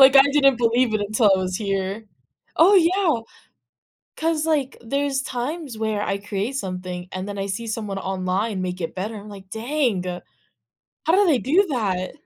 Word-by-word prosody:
Like, 265 0 +9
I 270 - +10
didn't 275 -3 +5
believe 235 0 +2
it 215 - +1
until 210 +1 +3
I - - 0
was 185 -1 -2
here 195 0 -2 0.5
Oh, 370 +5 +6
yeah. 345 -7 +3 1.0
'Cause, 320 -1 0
like, 290 -5 0
there's 275 +3 -1
times 265 +1 -4
where 215 -1 -1
I 195 -1 -1
create 205 +5 -3
something, 180 -3 -5
and 185 +1 -5
then 205 -1 -5
I 195 - -2
see 205 +4 -4
someone 210 -3 -3
online 190 +2 -1
make 180 0 -4
it 165 - -3
better, 210 +4 -4
I'm 205 +1 -10
like, 195 -2 -11
"Dang, 235 -4 0 1.0
how 325 - +3
do 405 0 +5
they 295 -6 +4
do 335 - +3
that?" 190 -7 -1
220 Hz, 175 wpm, -23 LUFS, 195-275 Hz, 1.0 s, I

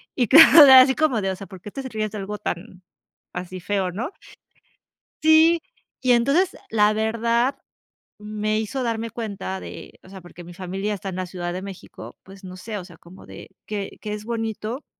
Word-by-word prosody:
y 245 -3 +1
claro, 305 -2 +9
así 260 0 +8
como 305 -8 +1
de 190 0 -1
o - - -4
sea, 195 - -10
porque 190 +1 -11
te 275 - -6
ríes 215 -2 -3
de 215 - -7
algo 210 +2 -5
tan 185 +1 -6 0.5
así 180 +1 -6
feo, 195 -1 -1
¿no? 230 - -5 1.1
Sí, 320 +1 +5 0.4
y 255 -1 +3
entonces, 275 +10 +2
la 210 -1 +3
verdad 230 +4 0 0.6
me 215 0 -2
hizo 255 +4 -3
darme 230 -1 -2
cuenta 200 -4 -5
de, - - -11
o 185 - -16
sea, 190 -1 -11
porque 175 0 -13
mi 175 - -12
familia 190 +3 -4
está 195 -1 -6
en 185 - -6
la 185 0 -3
Ciudad 175 -1 -5
de 185 +1 -6
México, 195 -2 -10
pues 195 0 -15
no 185 0 -9
sé, 210 +3 -7
o 180 - -7
sea, 170 -3 -15
como 175 +2 -16
de - - -12 0.2
que 205 -2 -6
que 210 - -5
es 210 0 -6
bonito, 225 +2 -4
210 Hz, 190 wpm, -22 LUFS, 190-235 Hz, 1.1 s, claro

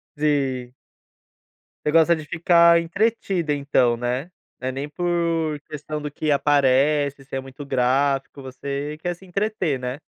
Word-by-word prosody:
Sim. 135 -4 0 1.1
Você 150 - +2
gosta 165 +1 +5
de 155 -1 -8
ficar 170 +1 +5
entretida 185 -3 0
então, 135 -4 +2
né. 125 +8 -3 0.3
Não 130 - -3
é - - -2
nem 140 +3 -5
por 165 -2 -1
questão 150 0 -5
do 150 - -4
que 155 0 -1
aparece, 140 0 +2
se 135 - -8
é - - -1
muito 135 +2 -9
gráfico, 135 +1 0
você 140 +3 -5
quer 175 0 -1
se 190 - -19
entreter, 185 -7 -1
né. 125 +3 -4
145 Hz, 150 wpm, -23 LUFS, 135-165 Hz, 1.1 s, gosta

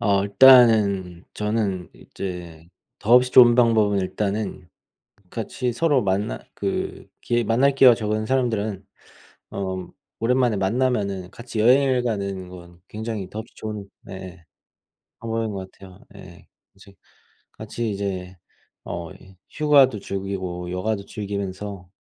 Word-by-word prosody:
어 100 -4 +2
일단은 100 -6 +5
저는 105 -4 -2
이제 85 -4 -8 0.3
더없이 125 +4 +4
좋은 120 -2 +8
방법은 110 -4 +3
일단은 100 -1 -3 0.6
같이 125 -2 -3
서로 145 -2 +2
만날 95 -9 -2
그 - - -4
기회 120 0 0
만날 125 +5 +2
기회가 130 -3 +7
적은 110 -1 -2
사람들은 110 -6 -1 0.7
어 95 -1 -3
음 90 - -8 0.3
오랜만에 125 -1 +2
만나면은 100 -3 -1
같이 120 -2 -6
여행을 130 +2 +4
가는 100 -5 -3
건 85 -1 -13
굉장히 110 -3 -5
더없이 110 +2 -8
좋은 105 -2 -6 0.2
네 - - -9
예 90 -2 -10 0.8
방법인 115 -1 -3
것 95 -1 -6
같아요. 95 -2 -15 0.2
예 - - -12
예. - - -16 0.3
이제 100 0 -17 0.6
같이 115 -2 -4
이제 95 -2 -4 0.5
어 85 0 -6
이 95 0 -17
휴가도 140 -7 +4
즐기고 95 -3 -5
여가도 100 +2 -2
즐기면서 100 -2 -6
105 Hz, 265 characters per minute, -23 LUFS, 95-115 Hz, 0.8 s, 좋은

